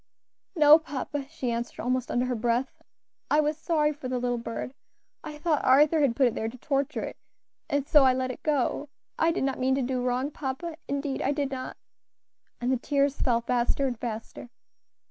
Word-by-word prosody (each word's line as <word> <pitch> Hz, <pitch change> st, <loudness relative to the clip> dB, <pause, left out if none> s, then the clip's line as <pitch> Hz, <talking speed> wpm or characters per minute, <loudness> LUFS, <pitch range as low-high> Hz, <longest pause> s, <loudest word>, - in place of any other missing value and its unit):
"No, 305 Hz, -1 st, +8 dB
papa," 290 Hz, -2 st, -5 dB
she 270 Hz, -6 st, -3 dB
answered 235 Hz, +1 st, -4 dB
almost 255 Hz, 0 st, -1 dB
under 245 Hz, +1 st, +1 dB
her 250 Hz, -, -1 dB
breath. 240 Hz, +3 st, -1 dB, 0.5 s
"I 295 Hz, -, +4 dB
was 300 Hz, 0 st, +1 dB
sorry 305 Hz, -1 st, +1 dB
for 285 Hz, -3 st, -7 dB
the 255 Hz, 0 st, -1 dB
little 245 Hz, -1 st, -1 dB
bird. 230 Hz, +2 st, -5 dB, 0.5 s
I 300 Hz, -, -7 dB
thought 305 Hz, -1 st, 0 dB
Arthur 295 Hz, +5 st, +5 dB
had 265 Hz, -5 st, +2 dB
put 265 Hz, -, +4 dB
it 240 Hz, -, +2 dB
there 220 Hz, -, -2 dB
to 250 Hz, -, -11 dB
torture 275 Hz, +1 st, -1 dB
it, -, -, -5 dB, 0.5 s
and 285 Hz, -1 st, 0 dB
so 295 Hz, -2 st, +6 dB
I 260 Hz, -1 st, +5 dB
let 255 Hz, 0 st, -1 dB
it -, -, -10 dB
go. 290 Hz, -1 st, 0 dB, 0.3 s
I 325 Hz, -, +4 dB
did 330 Hz, -, -1 dB
not 270 Hz, 0 st, -1 dB
mean 260 Hz, +1 st, +2 dB
to 270 Hz, -, 0 dB
do 250 Hz, 0 st, -1 dB
wrong, 255 Hz, +3 st, 0 dB
papa, 310 Hz, +4 st, -5 dB
indeed 280 Hz, -1 st, -2 dB
I 275 Hz, -, +1 dB
did 285 Hz, -1 st, -1 dB
not," 255 Hz, -1 st, -5 dB, 0.8 s
and 245 Hz, +1 st, 0 dB
the 260 Hz, -, +2 dB
tears 280 Hz, +2 st, 0 dB
fell 235 Hz, -3 st, +2 dB
faster 245 Hz, +3 st, +1 dB
and 245 Hz, -4 st, -2 dB
faster. 225 Hz, 0 st, -6 dB
265 Hz, 200 wpm, -27 LUFS, 250-295 Hz, 0.8 s, No